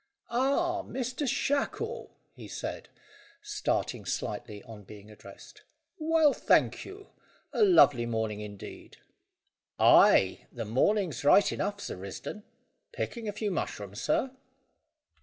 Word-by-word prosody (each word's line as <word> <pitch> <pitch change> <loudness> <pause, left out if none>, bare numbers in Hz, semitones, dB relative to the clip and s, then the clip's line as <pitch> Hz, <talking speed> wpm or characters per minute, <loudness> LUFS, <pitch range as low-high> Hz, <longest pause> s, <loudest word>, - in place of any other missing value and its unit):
"Ah, 305 +8 +1
Master 255 +3 -4
Shackle," 275 +2 -2 0.2
he - - -11
said, - - -6 0.5
starting 420 0 -2
slightly 105 -3 -4
on 110 -2 -11
being 105 +2 -13
addressed. 105 - -14 0.4
"Well, 315 -2 +3
thank - - +2
you. 395 +1 -11 0.4
A - - 0
lovely 145 - +6
morning, 110 -2 -2
indeed." 105 -2 -10 0.8
"Ay, 95 - +5
the 115 -2 -5
morning's 160 - +1
right 195 +8 +5
enough, 205 0 -3
Sir 200 - -6
Risdon. 100 - -7 0.5
Picking 235 - -5
a - - -1
few 205 0 -3
mushrooms, 105 - -4
sir?" 265 - 0
205 Hz, 115 wpm, -29 LUFS, -, 0.8 s, lovely